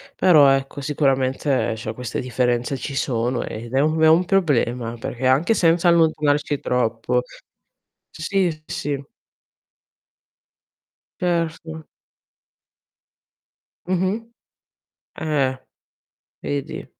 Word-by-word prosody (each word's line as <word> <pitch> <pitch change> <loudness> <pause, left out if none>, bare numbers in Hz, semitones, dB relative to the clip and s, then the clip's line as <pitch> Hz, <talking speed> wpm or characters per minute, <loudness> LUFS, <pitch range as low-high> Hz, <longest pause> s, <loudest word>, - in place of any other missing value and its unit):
Però 160 -6 +6
ecco 135 +1 0
sicuramente, 135 -3 0
cioè 110 0 -5
queste 125 -1 -5
differenze 125 +1 -1
ci 140 - -6
sono 120 -1 -1
e 110 - -6
ed 120 +1 -10
è 135 - +3
un 155 +3 +1
un 160 +3 +5
problema, 125 - 0
perché 120 +2 -5
anche 140 - +3
senza 170 -1 +3
allontanarci 150 -4 +2
troppo 125 0 0 0.9
sì, 180 +3 0
sì, 155 -1 -13
sì. 140 -1 -3 2.2
Certo. 165 -2 -2 2.0
Mh-mh. 190 +6 -1 0.9
Eh. 140 -4 0 0.8
Vedi. 140 -1 -4
145 Hz, 90 wpm, -22 LUFS, 125-165 Hz, 2.2 s, Però